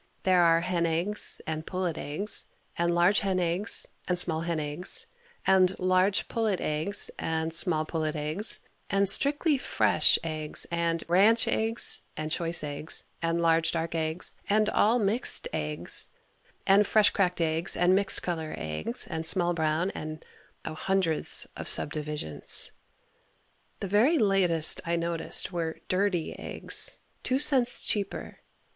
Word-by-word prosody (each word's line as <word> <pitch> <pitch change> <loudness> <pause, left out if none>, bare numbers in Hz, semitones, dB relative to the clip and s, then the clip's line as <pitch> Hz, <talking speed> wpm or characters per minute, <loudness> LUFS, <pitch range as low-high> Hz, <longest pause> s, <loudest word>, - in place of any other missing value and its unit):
There 185 -2 +2
are 165 -1 +2
hen 170 -1 -2
eggs 175 +6 -1
and 155 0 -6
pullet 180 -2 -5
eggs 195 +10 +4 0.3
and 170 0 -2
large 175 +4 +1
hen 190 -2 -3
eggs 180 +5 +5 0.2
and 180 - -2
small 165 -3 +1
hen 170 -1 -4
eggs 150 +4 +3 0.4
and 185 -1 +1
large 185 +2 -1
pullet 220 -5 -3
eggs 155 +7 +1
and 160 0 -4
small 165 -2 +2
pullet 155 -1 -5
eggs 155 +8 0 0.3
and 195 0 0
strictly 285 - +4
fresh - - +1
eggs 155 -2 -1
and 170 -1 -3
ranch 205 +7 +2
eggs 225 +1 +1 0.2
and 155 0 -6
choice 170 0 -1
eggs 145 +1 -2 0.2
and 165 0 -2
large 165 0 +1
dark 165 0 -5
eggs 160 +1 -3 0.2
and 215 +1 0
all 225 +4 +1
mixed 225 - +2
eggs - - 0 0.6
and 200 +1 +2
fresh 215 -2 +2
cracked 180 -3 -2
eggs 165 +2 -1
and 180 +1 +1
mixed 195 +1 +4
color 160 -3 -6
eggs 80 +7 -4
and 160 - -7
small 175 +1 +3
brown 160 +3 -2
and, 155 -2 -10 0.4
oh, 160 - -6
hundreds 185 -1 +1
of - - -8
sub 145 - 0
divisions. 150 - +1 1.1
The 195 - -5
very 225 - +1
latest 185 - +2
I 170 -1 -3
noticed 170 0 -1
were 165 -2 -5
"dirty" 185 -3 -2
eggs, - - +1 0.2
2 255 - -2
cents 270 -4 +4
cheaper. 205 -2 -4
175 Hz, 145 wpm, -25 LUFS, 160-195 Hz, 1.1 s, eggs